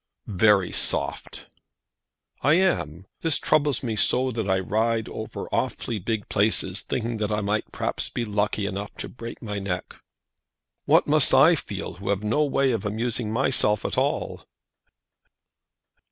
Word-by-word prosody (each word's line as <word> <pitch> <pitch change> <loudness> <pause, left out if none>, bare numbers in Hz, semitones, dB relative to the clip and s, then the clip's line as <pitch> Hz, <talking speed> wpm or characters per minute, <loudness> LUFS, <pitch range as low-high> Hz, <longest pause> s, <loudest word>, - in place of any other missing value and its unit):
"Very 100 -1 +3
soft!" - - -1 1.0
"I 145 +3 +4
am. 95 - 0 0.2
This 160 -5 +1
troubles 145 -4 +1
me 115 -3 -2
so 130 +5 +2
that 110 -4 -3
I 95 - +3
ride 110 +4 0
over - - -6
awfully 110 - -2
big 110 +2 -3
places, 100 -2 +1
thinking 115 -1 -3
that 105 -1 -2
I 105 0 0
might 105 +1 -1
perhaps - - -3
be 120 - -3
lucky 105 -1 -1
enough 100 +1 -5
to - - -5
break 115 -1 -9
my 105 -2 -3
neck." 95 -2 -4 0.9
"What - - +4
must 150 -3 +4
I 145 +6 +7
feel, 100 - -4
who 100 +1 -6
have 100 0 0
no 115 +9 +2
way 135 -2 +2
of 115 -5 -2
amusing 110 +1 -2
myself 110 -3 +1
at - - -1
all?" - - -1
110 Hz, 150 wpm, -25 LUFS, 100-125 Hz, 1.0 s, I